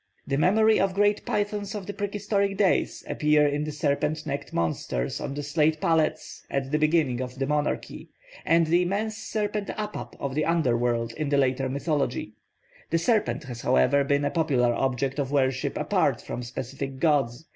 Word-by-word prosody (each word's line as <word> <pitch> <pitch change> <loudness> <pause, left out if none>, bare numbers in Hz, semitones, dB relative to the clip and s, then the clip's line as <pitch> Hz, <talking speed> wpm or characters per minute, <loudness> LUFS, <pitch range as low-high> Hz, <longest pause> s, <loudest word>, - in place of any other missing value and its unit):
The 140 - -1
memory 215 +8 +4
of 190 -1 +1
great 205 +1 +2
pythons 205 0 -2
of 200 -2 -5
the 205 - -5
prehistoric 200 -1 -1
days 195 -2 +1
appears 150 -1 +3
in 150 +1 -1
the 155 - -4
serpent 150 +1 -1
necked 140 -1 -4
monsters 70 -6 -2
on 140 - -4
the 145 - -4
slate 150 +2 +1
palettes 160 -1 0
at 135 0 -2
the 150 - +2
beginning 155 -5 +2
of 125 0 -6
the 135 - 0
monarchy, 150 +1 -2 0.3
and 165 0 +4
the 170 +3 +3
immense 205 +5 -1
serpent 210 -2 -2
Apap 210 -1 -5
of 140 -1 -3
the 155 +2 0
underworld 120 -7 +1
in 155 +1 -3
the 140 - +2
later 130 -1 +1
mythology. 140 -5 -1 0.6
The 165 - +2
serpent 210 -2 +1
has 125 -4 -7
however 65 - +3
been 140 +1 +1
a 145 - 0
popular 130 -7 +2
object 135 +2 -1
of 135 -1 -2
worship 130 -2 0
apart - - +1
from 125 - -6
specific 130 +2 -5
gods. 135 -3 +1
150 Hz, 175 wpm, -26 LUFS, 135-180 Hz, 0.6 s, memory